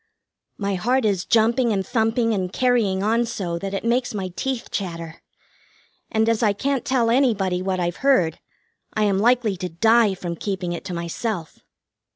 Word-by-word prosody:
My 200 -1 -1
heart 240 +7 +1
is 195 -4 0
jumping 230 +2 +3
and 195 -2 0
thumping 225 +2 +1
and 185 -3 -2
carrying 225 -6 +1
on 230 +3 +2
so 175 -7 -3
that 195 +2 -4
it - - -3
makes 240 0 0
my 190 -2 -3
teeth 265 -3 -3
chatter; 165 -4 -5 0.9
and 220 0 +2
as 230 0 +2
I 210 -3 +3
can't 270 +5 -1
tell 240 -3 +1
anybody 210 -8 +2
what 185 0 -1
I've 175 -1 -1
heard, 185 - +2 0.6
I 215 - +2
am 200 -2 +2
likely 235 -2 +3
to 180 0 -4
die 220 +3 +3
from 175 -2 -5
keeping 185 -3 -3
it 170 - -6
to 180 - -4
myself. 170 +1 -4
210 Hz, 175 wpm, -22 LUFS, 185-235 Hz, 0.9 s, jumping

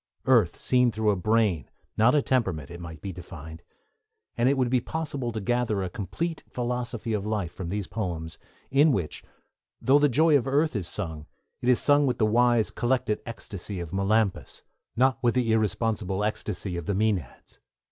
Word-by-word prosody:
Earth 115 -10 +3
seen 125 -1 +3
through 110 0 +1
a - - +1
brain, 100 - +1 0.3
not 115 +6 +4
a 145 - +3
temperament, 95 - 0
it 85 - -8
might 80 -3 -9
be 95 - -4
defined; 80 -2 -10 0.7
and 120 +2 +3
it 140 - +2
would 125 -2 +1
be 125 -1 +3
possible 145 -5 -3
to 110 - -4
gather 110 -2 0
a 90 - -4
complete 155 - -4
philosophy 120 -2 -3
of 105 -2 -1
life 105 -5 -2
from 90 -3 -6
these 100 +1 -2
poems, 85 -6 -4 0.3
in 145 +3 +5
which, 90 - -2 0.6
though 140 +3 +4
'the 145 0 +4
joy 155 +4 +4
of 135 -2 +2
earth' 145 +1 +1
is 95 -5 -2
sung, 80 -7 -3 0.3
it 125 - 0
is 125 - +5
sung 145 -1 +4
with 125 -2 0
the 110 - +3
wise, 120 0 +3
collected 120 -3 0
ecstasy 100 -4 -6
of 85 0 -6
Melampus, 100 +1 0 0.3
not 130 +2 +2
with 120 -1 +2
the 120 -3 +2
irresponsible 105 -2 0
ecstasy 100 -3 -3
of 85 - -6
the 100 - 0
Mænads. 100 - -2
110 Hz, 180 wpm, -26 LUFS, 95-125 Hz, 0.7 s, in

